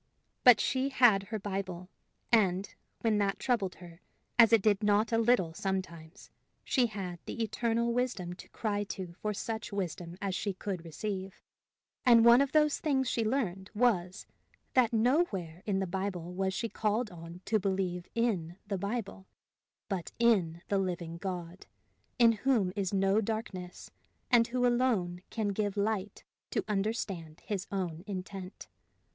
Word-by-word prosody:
But 245 -4 +8
she 265 0 +1
had 245 -7 +5
her 220 - -2
Bible, 190 -3 -4 0.4
and, 195 -4 +2 0.3
when 220 -2 +2
that 200 -1 +1
troubled 225 -8 0
her, 175 0 -13 0.4
as 230 -1 +8
it 225 -4 +5
did 210 -1 +3
not 210 +1 +2
a 225 - +3
little 225 -8 +3
sometimes, 180 -1 -5 0.3
she 250 -3 +2
had 190 -5 -6
the 230 - -2
Eternal 235 +1 0
Wisdom 235 -8 -1
to 180 - -13
cry 205 -2 -2
to 185 -3 -6
for 215 - -1
such 220 +2 -4
wisdom 175 -3 -4
as 195 -2 -2
she 195 +1 -2
could 185 -3 -4
receive; 190 +3 -5 0.6
and 235 -2 +7
one 235 +2 +8
of 280 - +1
the 305 -1 +5
things 280 -3 0
she 235 - 0
learned 210 -6 -1
was, 195 -6 +1 0.5
that 250 -3 +4
nowhere 220 - +1
in 200 -2 +1
the 190 - 0
Bible 185 -2 -3
was 190 +1 0
she 215 +4 -2
called 215 0 -1
on 170 +1 -10
to 220 - +2
believe 185 -2 -1
in 190 -8 0
the 200 -2 -3
Bible, 200 -1 -4 0.6
but 190 -4 -3
in 190 -8 +2
the 200 - +1
living 175 -3 -3
God, 180 -1 -6 0.5
in 235 -1 +7
whom 220 -5 +1
is 195 -3 -1
no 195 +2 +3
darkness, 200 -5 -5 0.4
and 235 -2 +6
who 250 +1 0
alone 235 -8 +1
can 215 -2 -1
give 205 0 -1
light 205 -1 -1 0.3
to - - -1
understand 195 -6 -2
his 200 -2 -3
own 180 -4 -3
intent. 190 -1 -7
200 Hz, 155 wpm, -31 LUFS, 185-230 Hz, 0.6 s, But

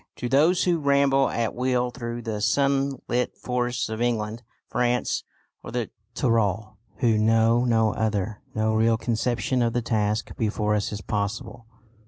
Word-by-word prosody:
To 125 - -4
those 155 +8 +4
who 175 -2 +2
ramble 140 -2 +3
at 115 -1 -1
will 125 0 0
through 120 -1 -5
the 110 -2 -3
sunlit 135 -1 0
forests 125 -1 -1
of 110 +1 -5
England, 115 -1 -1 0.3
France, 125 0 0 0.4
or - - -9
the - - -3 0.2
Tyrol, 110 -2 0 0.2
who 115 -1 +2
know 115 +2 +3
no 115 -2 +2
other, 105 -1 -2
no 110 0 +1
real 110 +1 +3
conception 120 +1 0
of 115 -1 +1
the 120 - 0
task 110 -1 -1
before 105 -1 0
us 105 -1 -1
is 105 0 -5
possible. 105 +3 -4
115 Hz, 150 wpm, -25 LUFS, 110-125 Hz, 0.4 s, those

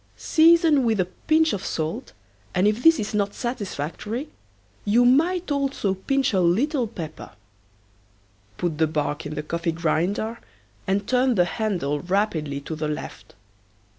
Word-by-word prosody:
Season 325 -3 +4
with 225 -3 +1
a 185 - +3
pinch 315 - +1
of 195 - -3
salt, 160 0 -4 0.4
and 185 +3 +3
if 215 +3 +1
this 325 +2 +6
is 215 0 -3
not 205 -1 0
satisfactory, 220 - -4 0.5
you 235 +4 +3
might 330 +7 +2
also 275 -8 0
pinch 265 +7 0
a 190 - +3
little 240 - +1
pepper. 165 -8 -8 1.3
Put 165 -4 -2
the 160 - +4
bark 150 -1 -2
in 150 - -6
the 150 - -3
coffee 170 +2 -2
grinder 175 +8 -1 0.5
and 200 +1 0
turn 255 -1 +2
the 180 -3 +4
handle 175 -8 -2
rapidly 175 -7 -1
to 160 +3 -6
the 155 0 -3
left. 150 -9 -7
205 Hz, 145 wpm, -24 LUFS, 165-255 Hz, 1.3 s, this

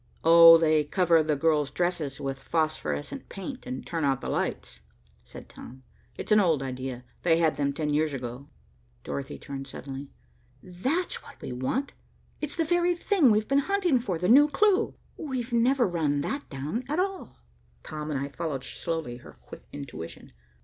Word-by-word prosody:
"Oh, 165 0 +9
they 155 -2 +3
cover 165 +1 +3
the 155 -1 0
girls' 150 -1 +2
dresses 175 -6 -2
with 135 -1 -4
phosphorescent 155 - -2
paint, 255 +7 -7
and 255 - -5
turn 165 -3 -3
out 135 -2 +2
the - - -5
lights," - - -3 0.4
said - - -11
Tom. 130 +2 -12 0.3
"It's - - -6
an 210 - +7
old 165 -8 +2
idea. 130 -1 -5 0.2
They 165 -2 +3
had 160 -3 +2
them 140 0 0
ten 150 +1 -2
years 155 +1 +1
ago." 130 +1 -6 0.5
Dorothy 140 -1 -5
turned 135 -1 -7
suddenly. 135 +1 -8 0.5
"That's 260 - -2
what - - -15
we - - -6
want. 130 - -2 0.5
It's 300 -1 -3
the 330 - 0
very 350 +1 +2
thing 345 - +3
we've 215 0 +2
been 275 0 +3
hunting 370 -9 +2
for, 195 -8 -2
the 180 +2 -1
new 280 +7 +7
clue. 415 +7 +2 0.2
We've 255 -5 -4
never 245 +1 +3
run 155 -5 0
that 280 - -4
down, 150 - -4
at 305 +4 0
all." 385 -1 -3 0.5
Tom 155 0 -6
and 145 -3 -1
I 140 +1 -3
followed 140 -2 -4
slowly 160 -5 -4
her 120 - -14
quick - - -12
intuition. 140 - -8
165 Hz, 170 wpm, -27 LUFS, -, 0.5 s, Oh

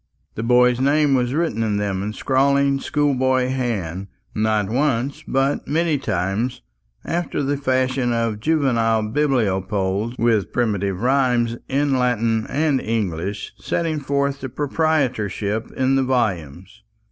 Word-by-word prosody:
The - - -5
boy's 125 +1 +4
name 145 +2 +3
was 125 0 +1
written 160 -9 0
in 105 -2 0
them 100 -2 -1
in 100 - -3
a - - -6
scrawling 140 +2 +2
schoolboy 130 -3 +1
hand; 100 -9 -2 0.3
not 110 -1 +1
once, 135 +4 -1
but 135 +2 0
many 160 -1 +1
times, 105 +3 -2 0.4
after 170 -3 -2
the 140 +1 0
fashion 130 -2 0
of 115 -2 -1
juvenile 115 -6 +1
bibliopoles, 105 -4 0
with 110 -6 +1
primitive 100 -4 -1
rhymes 125 -3 +2
in 140 -1 +1
Latin 115 -3 +1
and 145 -2 +1
English 100 -3 -3
setting 160 -2 -1
forth 140 0 -1
his 130 - -4
proprietorship 125 - -1
in 130 +1 +2
the 135 - +2
volumes. 100 - -2
125 Hz, 130 wpm, -21 LUFS, 110-140 Hz, 0.4 s, boy's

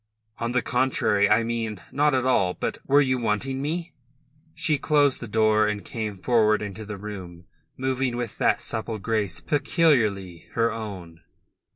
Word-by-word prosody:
"On 115 0 -2
the 125 -1 +1
contrary. 125 -5 +2
I 110 +2 +4
mean... 115 -3 -3
not 145 0 +2
at 130 -1 0
all. 95 -8 +2
But... - - -3
were 140 +2 +5
you 130 -2 +1
wanting 120 +4 -1
me?" 165 +3 -3 0.6
She 150 -3 0
closed 145 -2 +3
the 120 - -6
door, 110 0 +3
and 105 -1 -3
came 110 -4 -4
forward 110 0 +2
into 105 +1 -7
the 105 -1 -6
room, 95 -4 -8 0.3
moving 130 -1 -1
with 120 -3 -5
that - - +2
supple 110 0 -3
grace 105 -4 -2
peculiarly 110 - +1
her 115 0 +2
own. 95 -7 -7
115 Hz, 160 wpm, -25 LUFS, 105-130 Hz, 0.6 s, were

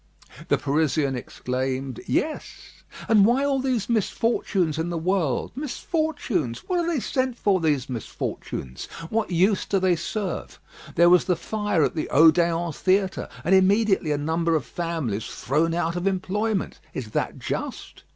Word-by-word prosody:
The - - +3
Parisian 145 -1 +1
exclaimed: 130 +1 -3
"Yes; 310 +1 -3 0.3
and 215 -3 +6
why 245 +6 +3
all 275 -1 +1
these 255 -6 0
misfortunes 205 -7 0
in 165 +2 -1
the 170 - -2
world? 165 -5 0
Misfortunes! 275 - -2
What 360 -1 +1
are 340 - 0
they 335 -4 +1
sent 255 0 -1
for, 200 -4 +2
these 145 -5 +1
misfortunes? 110 - -5 0.2
What 225 0 0
use 190 +3 +2
do 200 - +1
they 185 -2 +3
serve? 190 +3 -4 0.4
There 170 +1 +6
was 180 - +5
the 180 -1 +2
fire 205 -1 0
at - - +1
the 155 - -3
Odéon 165 +2 +4
theatre, 190 0 +1
and 185 - +2
immediately 190 -2 +4
a 145 - +1
number 165 +3 0
of 150 -6 -1
families 150 - -3
thrown 160 +5 0
out 170 0 -1
of 175 +2 -1
employment. 195 +2 -1 0.2
Is 115 -5 -5
that - - -2
just? - - -5
175 Hz, 150 wpm, -24 LUFS, 155-215 Hz, 0.4 s, and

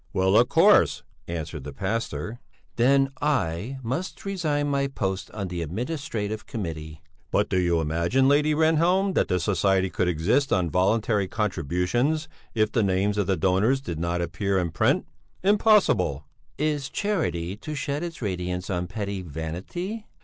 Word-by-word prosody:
"Well, 95 +1 +2
of - - +5
course," - - +5 0.2
answered 80 -3 -5
the 70 +1 -7
pastor. 115 - -3 0.4
"Then 135 +3 +3
I 130 - 0
must 130 - -4
resign 155 -7 0
my 140 -1 +1
post 95 -8 -3
on 100 -3 -5
the 85 -1 -4
Administrative 110 - -4
Committee." 80 -6 -6 0.3
"But 105 - +1
do 95 - +2
you 85 -2 +2
imagine, 85 - +1
Lady 150 +2 +3
Rehnhjelm, 170 +5 +3
that - - +2
the 90 - +1
society 95 0 +1
could 90 - 0
exist 95 - +1
on 90 -3 +1
voluntary 100 +2 +2
contributions 105 - 0 0.3
if 110 -1 +2
the 115 - +2
names 100 +1 +1
of 100 - 0
the 95 -2 +1
donors 100 +8 +2
did 85 - -5
not 85 +1 -1
appear 100 +2 -1
in 90 -3 0
print? 85 - +2 0.4
Impossible!" 190 - +3 0.3
"Is 150 -2 -1
charity 95 - -1
to 155 +7 -6
shed 145 +1 -2
its 170 -6 -6
radiance 90 -1 -3
on 90 -1 -1
petty 100 0 -4
vanity?" 90 - -5
100 Hz, 150 wpm, -25 LUFS, 90-140 Hz, 0.4 s, of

